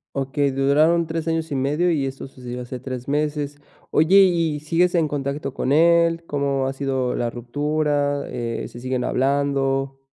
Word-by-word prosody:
Okey, 140 +1 0
duraron 150 +5 +3
3 160 0 -4
años 165 -1 -1
y 140 - -1
medio, 150 +7 +1
y 140 -4 0
eso 135 0 -7
sucedió 125 -1 -8
hace 125 +1 -7
3 125 -1 -6
meses. 145 0 -2 0.3
Oye, 160 +6 +4
¿y 165 -5 +1
sigues 170 +4 +1
en 165 -3 +3
contacto 140 -1 -3
con 135 - -2
él? 170 +1 +4
¿Cómo 140 -3 -1
ha 135 - -2
sido 135 -2 -1
la 120 - -1
ruptura? 145 +3 -1
Eh, 120 -2 -4
¿se 120 - -11
siguen 130 0 -2
hablando? 135 0 0
140 Hz, 165 wpm, -22 LUFS, 135-155 Hz, 0.3 s, Oye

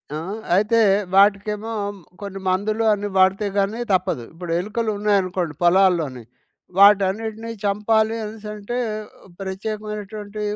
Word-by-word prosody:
ఆ! - - -2 0.4
అయితే 215 +4 +3 0.4
వాటికేమో, 210 +2 +3 0.5
కొన్ని 200 -1 -6
మందులు 215 +4 0
అన్ని 205 0 -3
వాడితే 190 +2 +3
గాని, 200 +4 0
తప్పదు. 180 -10 0
ఇప్పుడు 170 0 -7
ఎలుకలున్నాయనుకోండి 200 -5 -1
పొలాల్లోని, 175 -8 +3 0.6
వాటన్నిటిని 210 +3 +3
చంపాలి 220 +2 +2
అనేసంటే, 210 +1 -6 0.6
ప్రత్యేకమైనటువంటి 210 +1 -5
205 Hz, 90 wpm, -22 LUFS, 190-215 Hz, 0.6 s, అయితే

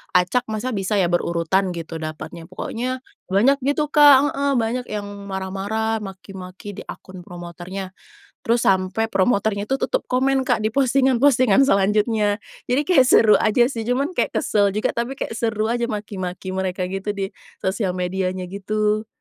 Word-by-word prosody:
acak, 180 +8 +2
masa 220 +4 -3
bisa 200 0 -1
ya 180 -3 +2
berurutan 175 +2 0
gitu 165 -1 -6
dapatnya. 160 +1 -7
Pokoknya, 250 +7 -4 0.2
banyak 245 +9 +3
gitu 290 +3 -1
Kak 290 -1 +7
heeh. 280 0 0
Banyak 240 +2 -1
yang 210 -1 -4 0.2
marah-marah, 200 +4 -2
maki-maki 190 0 -9
di - - -7
akun 185 -1 -10
promotornya. 180 +1 -7 0.5
Terus, 235 +1 +2
sampai 190 +4 +1
promotornya 200 0 +1
itu 270 +5 -2
tutup - - -1
komen 265 +1 +1
Kak, 245 -4 +1
di 215 - +1
postingan-postingan 260 -1 +3
selanjutnya. 210 -1 +2 0.3
Jadi, 270 +4 +1
kayak 265 -8 +4
seru 215 -2 +6
aja 220 +2 +4
sih, 240 -2 -2
cuman 275 +7 0
kayak - - -1
kesel 205 -1 +2
juga, 210 +2 -1
tapi 235 +3 -3
kayak - - -4
seru 225 -1 -1
aja 240 -1 -1
maki-maki 190 -3 -5
mereka 185 -1 -2
gitu 195 +2 -4
di 195 0 -3 0.3
sosial 190 -1 -1
medianya 185 0 -2
gitu. 210 +3 -1
210 Hz, 155 wpm, -22 LUFS, 190-245 Hz, 0.5 s, Kak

